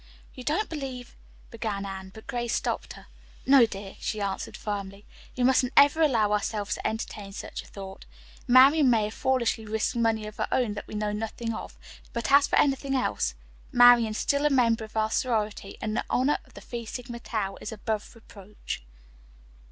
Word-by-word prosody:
"You 255 - -9
don't 325 - 0
believe 265 -5 -6 0.2
" - - -26
began 215 -4 -3
Anne, 190 -1 -7
but 220 +2 -13
Grace 240 -1 -2
stopped - - -2
her. - - -14 0.4
"No, 265 -3 +7
dear," 195 -2 -8
she 215 - -3
answered 200 -1 -3
firmly. 200 -1 -5 0.3
"We 250 - +1
mustn't 255 0 +3
ever 285 +3 +6
allow 230 -9 +3
ourselves 210 0 -1
to - - -2
entertain 210 -2 -5
such - - -6
a - - -17
thought. 195 0 -9 0.4
Marian 265 +3 +7
may 225 -3 +3
have 210 +1 -3
foolishly 240 -3 0
risked 220 +2 -1
money 225 -2 +1
of 210 0 -9
her - - -1
own 240 -5 +1
that 205 - -7
we - - -8
know 210 0 -1
nothing 225 +2 -3
of, - - -8 0.4
but 235 +2 -2
as 280 0 +6
for - - 0
anything 275 -1 +2
else 255 - 0 0.4
Marian 245 -2 +7
is 215 - -4
still 280 0 +1
a - - +2
member 235 -5 +3
of 220 0 -8
our 220 0 +1
sorority 215 -5 -1
and 215 0 -2
the - - -1
honor 265 +4 +2
of - - -23
the - - -10
Phi 235 -1 -6
Sigma 240 +1 -6
Tau 205 -5 -3
is - - -5
above 220 +1 -4
reproach." 210 - -8
225 Hz, 190 wpm, -27 LUFS, 210-255 Hz, 0.4 s, No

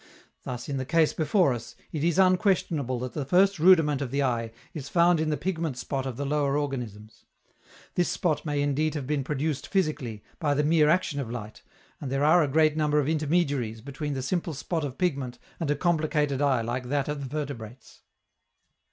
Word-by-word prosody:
Thus, 125 -1 -6
in 140 - -2
the 130 - -2
case 160 +2 +3
before 160 -1 +2
us, 120 -1 -7 0.2
it 155 -2 -3
is 170 +1 +2
unquestionable 180 - +2
that 125 0 -5
the 150 - -2
first 185 +6 +3
rudiment 160 -5 +5
of 135 - -2
the 140 +2 0
eye 115 -3 -1 0.2
is 140 -3 -6
found 170 0 +4
in 155 0 0
the 150 - 0
pigment 165 -7 -2
spot 135 +1 -3
of 125 -3 -5
the 140 - -2
lower 145 0 +1
organisms; 120 -7 -5 0.7
this 175 - +1
spot 160 -5 0
may 145 -2 -1
indeed 150 +2 0
have 145 -3 -3
been 145 0 -1
produced 145 +1 -2
physically, 145 - -1 0.2
by 145 -3 +1
the 150 - +2
mere 155 0 +4
action 155 -3 +1
of 130 -5 -4
light, 110 -3 -7 0.4
and 135 - -5
there 135 +1 0
are 160 +4 +6
a 150 - +2
great 155 +2 +3
number 150 -1 +1
of 140 - 0
intermediaries 145 -7 0
between 140 +4 -5
the 130 - -3
simple 170 +2 -2
spot 160 +4 -2
of 135 -3 -5
pigment 135 -9 -1 0.2
and 165 -4 -2
a 145 - +2
complicated 150 -4 +1
eye 135 -4 +3
like 120 +2 -3
that 140 -1 0
of 150 -1 -3
the 135 -2 -6
vertebrates. 130 -5 -7
145 Hz, 200 wpm, -27 LUFS, 130-160 Hz, 0.7 s, are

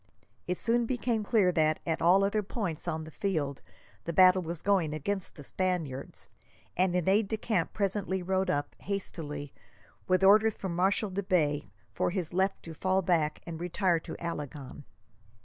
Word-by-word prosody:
It 180 0 -1
soon 235 0 +1
became 240 -3 -1
clear 205 -4 +3
that, 155 -2 +2
at 160 -2 -1
all 185 +4 +5
other 205 +2 +1
points 195 -6 -4
on 160 0 -2
the 155 - -10
field, 155 -8 -2 0.4
the 170 - -2
battle 185 +2 +6
was 170 -1 -5
going 180 -7 +2
against 190 +5 -3
the 145 - -10
Spaniards, 165 -6 -3 0.5
and 180 0 +2
an 180 -1 0
aide 200 +2 +3
de 220 - -2
camp 215 0 -1
presently 195 -2 -1
rode 190 +1 0
up, 145 -5 -1
hastily, 150 -8 -5 0.5
with 185 0 +2
orders 215 +2 +6
from 185 -3 -4
Marshal 195 +3 +1
de 195 +2 -2
Bay 150 - 0 0.2
for - - 0
his 175 -3 -3
left 190 +2 0
to 165 - -8
fall 185 +4 +1
back 165 -4 +1
and 165 -1 -6
retire 175 0 +1
to - - -8
Alagon. 145 -4 -6
180 Hz, 170 wpm, -30 LUFS, 160-195 Hz, 0.5 s, battle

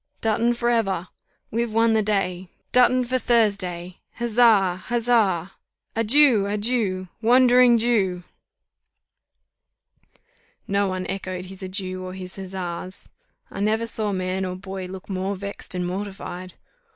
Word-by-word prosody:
Dutton 230 +2 +1
for 240 0 0
ever! 195 -6 0 0.4
We've 235 0 -1
won 225 +1 +3
the 220 - +3
day. 190 -3 -1 0.2
Dutton 250 0 +4
for 255 +1 -1
Thursday! 190 -7 0 0.2
Huzza! 225 -6 +3
Huzza! 220 -7 +1 0.4
Adieu! 230 -2 +4
Adieu! 205 -3 -1
Wandering 245 +1 +6
Jew!" 200 -6 +1 2.4
No 200 0 +1
one 185 -1 -3
echoed 185 -1 -4
his 190 +1 -8
adieu 185 -1 -4
or 185 0 -6
his 185 0 -7
huzzas. 185 -1 -6 0.4
I - - -7
never 220 +3 +1
saw 220 -2 -1
man 185 0 -2
or 185 -1 -3
boy 190 0 -6
look 185 0 -9
more 190 +1 -2
vexed 200 0 -6
and 180 0 -1
mortified. 185 -1 -6
200 Hz, 125 wpm, -23 LUFS, 185-230 Hz, 2.4 s, Wandering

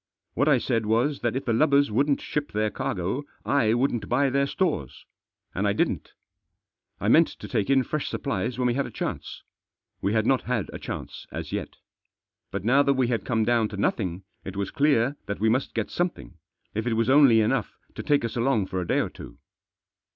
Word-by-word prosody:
What 140 +5 +1
I 145 -4 +5
said 115 -3 -1
was 120 +7 +1
that 120 0 -1
if 130 - -3
the 115 - +1
lubbers 140 +1 +3
wouldn't 140 +5 +2
ship 150 -1 -3
their 105 0 0
cargo, 95 +8 -2 0.2
I 115 -6 +2
wouldn't 120 -2 0
buy 135 +2 +2
their 140 +1 +2
stores. 150 - -2 0.5
And - - 0
I - - +2
didn't. - - -1 0.9
I - - -2
meant - - +6
to - - -10
take 100 - -1
in 135 -1 +4
fresh 155 +3 -3
supplies 120 -3 -2
when 125 - 0
we 120 - +2
had 135 +1 -1
a - - -8
chance. - - -5 0.6
We 100 +2 0
had 110 -1 +2
not 130 +1 +3
had 120 -6 -2
a - - -6
chance - - -7
as - - -6
yet - - -4 0.7
But - - -4
now 135 +5 +5
that 140 -1 +2
we 130 -2 +1
had 115 -2 -1
come 115 -2 +1
down 115 -2 +2
to 105 - -8
nothing 95 -2 -1 0.2
it 95 0 -7
was 100 -1 -2
clear 140 -3 +2
that 100 - -3
we 110 +2 +2
must 130 +4 0
get 110 -3 -2
some 175 +1 +1
thing, 95 - -15 0.3
if 110 +3 -2
it 120 - +1
was 115 0 +1
only 135 -5 +7
enough 110 - 0 0.2
to - - -6
take 145 -5 +2
us 115 - -4
along 120 -4 +1
for 95 -1 -3
a 85 - -5
day - - +2
or - - -2
two. - - -11
120 Hz, 215 wpm, -26 LUFS, 110-140 Hz, 0.9 s, only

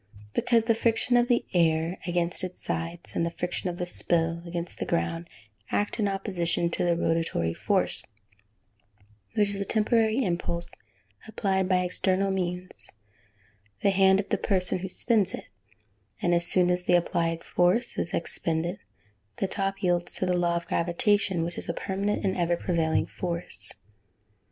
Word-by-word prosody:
_ - - -34
Because 230 -2 +3
the 230 0 +3
friction 230 +2 +1
of 240 0 +4
the 240 -1 +2
air 165 0 +2
against 175 +1 0
its 185 -1 -6
sides, 165 +1 -4
and - - +1
the 170 - +1
friction 180 +2 -3
of 175 - -5
the 180 - -2
spill 170 -1 0
against 170 0 -4
the - - -2
ground, 170 0 -1 0.4
act 205 +3 -1
in 210 - +2
opposition 175 -4 0
to - - -1
the 170 -1 +2
rotatory 165 - 0
force, - - 0 1.3
which 205 -1 +3
is 200 0 -3
a - - +2
temporary 220 +3 +2
impulse 170 -1 -2 0.6
applied 195 -3 0
by 180 -1 +3
external 190 +2 +1
means 180 -1 -3 0.9
the 200 - +5
hand 190 0 +5
of 200 - -3
the - - +1
person 185 -2 +1
who 190 +1 -5
spins 215 0 +1
it - - -10 0.7
and 175 - +1
as 170 0 +4
soon 180 -1 +5
as 180 0 -1
this 175 - +5
applied 165 -1 -1
force 180 +7 +2
is 165 - -1
expended, 170 +2 -1 0.6
the 195 - -1
top 195 0 -1
yields 175 -1 +1
to - - +1
the 180 - +1
law 175 -1 +1
of 170 0 -2
gravitation, 180 +1 +1
which 170 +1 -4
is - - -8
a 170 - -1
permanent 200 +2 -2
and 190 - +1
ever 175 -1 +1
prevailing 165 -3 +1
force. 175 -1 -3
180 Hz, 165 wpm, -27 LUFS, 170-195 Hz, 1.3 s, the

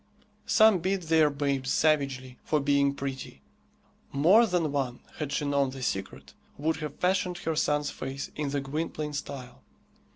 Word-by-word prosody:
Some 220 -4 +5
beat 190 +2 -1
their 160 -2 +4
babes 140 -2 -1
savagely 135 -4 +1
for 155 - +1
being 140 0 +2
pretty. 135 -1 -6 0.7
More 185 +12 +5
than 175 -6 0
one, 130 -3 -2 0.2
had 150 -2 -3
she 150 - -1
known 140 -1 +1
the 130 0 -7
secret, 95 -5 -4 0.2
would 160 +3 0
have 150 -2 -5
fashioned 180 -1 0
her 160 -2 -2
son's 150 -1 +1
face 135 +2 -6
in 150 -2 -2
the 140 0 -1
Gwynplaine 150 +1 -4
style. 140 -3 -7
145 Hz, 155 wpm, -28 LUFS, 140-160 Hz, 0.7 s, Some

